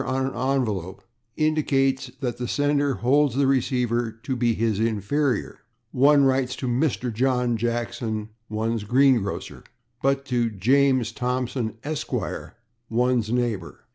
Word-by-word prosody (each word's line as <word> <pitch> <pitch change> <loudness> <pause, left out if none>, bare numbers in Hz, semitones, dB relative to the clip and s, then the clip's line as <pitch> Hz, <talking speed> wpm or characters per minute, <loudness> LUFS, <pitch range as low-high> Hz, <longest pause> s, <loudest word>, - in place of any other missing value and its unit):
on 130 +1 -1
an 135 - -3 0.2
envelope, 100 -8 -3 0.3
indicates 135 -4 +1
that 125 -3 -3
the 125 - -2
sender 145 -1 +1
holds 140 +2 +2
the 140 0 +3
receiver 125 -3 +1
to 130 - -2
be 120 -2 +1
his 110 -2 0
inferior; 115 +4 0 0.3
one 140 +2 +5
writes 130 -1 +1
to 130 - -4
/Mr./ 125 -1 0
John 125 0 +1
Jackson, 115 -1 -2 0.2
one's 110 0 -1
green 130 +2 +4
grocer, 100 0 -6 0.4
but 135 0 +1
to 120 -3 0
James 130 +3 +2
Thompson, 125 -1 -2
/Esq./, 155 0 -4 0.4
one's 120 -1 +1
neighbor. 120 -8 -2
125 Hz, 130 wpm, -24 LUFS, 115-135 Hz, 0.4 s, one